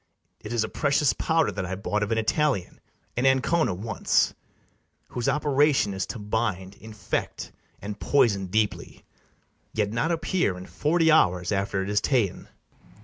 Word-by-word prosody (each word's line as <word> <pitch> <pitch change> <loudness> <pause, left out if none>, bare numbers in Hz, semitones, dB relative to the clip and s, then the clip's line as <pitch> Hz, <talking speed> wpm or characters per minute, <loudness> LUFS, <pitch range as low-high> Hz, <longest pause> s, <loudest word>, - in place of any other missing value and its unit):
It 105 - -8
is 120 -2 +1
a - - -2
precious 140 -2 +1
powder 160 +8 +1
that 100 - -4
I 90 +1 -3
bought 105 +2 -2
Of 105 +1 -2
an 115 - +1
Italian, 115 - 0 0.4
in 125 +2 +2
Ancona, 135 - +2
once, 110 +5 +1 0.8
Whose 120 - -1
operation 145 -6 +2
is 95 0 -3
to - - -6
bind, 105 -3 -2
infect, 110 -1 -5 0.3
And 105 0 -6
poison 110 -9 +2
deeply, 105 +3 -2 0.7
yet 105 -2 0
not 115 +9 0
appear 170 - 0
In 90 - -9
forty 160 - +2
hours 90 - +3
after 100 -1 -1
it 95 - -5
is 105 - +2
ta'en. 120 -10 0
110 Hz, 150 wpm, -26 LUFS, 100-140 Hz, 0.8 s, hours